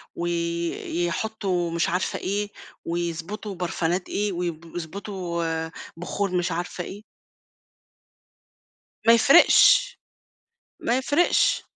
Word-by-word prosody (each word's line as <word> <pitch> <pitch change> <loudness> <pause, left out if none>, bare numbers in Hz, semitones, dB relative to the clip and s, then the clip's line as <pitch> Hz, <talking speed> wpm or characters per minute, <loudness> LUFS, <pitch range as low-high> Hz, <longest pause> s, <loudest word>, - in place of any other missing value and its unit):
ويحطوا 175 +2 -2
مش 170 0 0
عارفة 180 +2 -1
إيه، 205 +2 -2 0.4
ويضبُطوا 170 +5 -4
برفانات 175 0 -2
إيه، 205 0 -1
ويب 170 -2 -4
يضبُطوا 175 0 -4
آآ، 160 0 -2 0.3
بخور 185 +3 -2
مش 180 -1 0
عارفة 175 +1 -3
إيه. 205 +4 -9 2.0
ما 230 - +9
يفرقش، 320 - +6 0.8
ما 240 - +1
يفرقش، 345 - +2
175 Hz, 90 wpm, -25 LUFS, 170-205 Hz, 2.0 s, ما